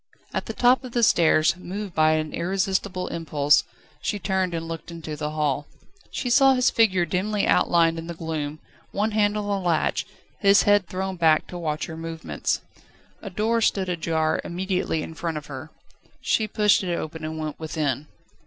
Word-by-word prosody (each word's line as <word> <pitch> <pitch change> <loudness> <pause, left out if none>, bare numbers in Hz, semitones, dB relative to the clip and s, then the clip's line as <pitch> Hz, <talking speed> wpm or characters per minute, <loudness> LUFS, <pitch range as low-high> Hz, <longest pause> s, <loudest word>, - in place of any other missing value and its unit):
At - - -2
the - - -4
top 250 +2 +4
of 250 -2 -8
the 240 - +1
stairs, 160 -5 +4
moved 190 +2 -6
by 155 0 +4
an 155 -1 -1
irresistible 190 +1 -1
impulse, 150 -3 +2 0.4
she 210 - -1
turned 190 -2 -1
and 165 0 -4
looked 165 0 -6
into 165 -2 -6
the 150 0 -3
hall. 150 -2 -1 0.4
She 255 - -4
saw 270 +1 +6
his 250 -1 +3
figure 190 -6 +3
dimly 200 +5 0
outlined 165 -1 +3
in 165 - -7
the 170 - -5
gloom, 155 -2 -4 0.3
one 210 +2 0
hand 210 0 +2
on 210 - -2
the 200 -1 0
latch, 165 -2 +1 0.3
his 200 -1 +5
head 205 -3 +4
thrown 190 +1 -3
back 160 -2 +4
to 180 - -6
watch 155 -2 -2
her 160 - -7
movements. 165 0 -3 0.6
A 200 - -6
door 220 +5 0
stood 195 -4 +1
ajar 160 -2 0
immediately 180 -3 -2
in - - -7
front 165 -1 -3
of 150 - -7
her. 140 +2 -8 0.5
She 220 - +1
pushed 210 -1 +3
it 175 -2 -1
open 160 -1 -5
and 160 0 -4
went 155 -1 -5
within. 155 -3 -2
170 Hz, 180 wpm, -24 LUFS, 155-200 Hz, 0.6 s, saw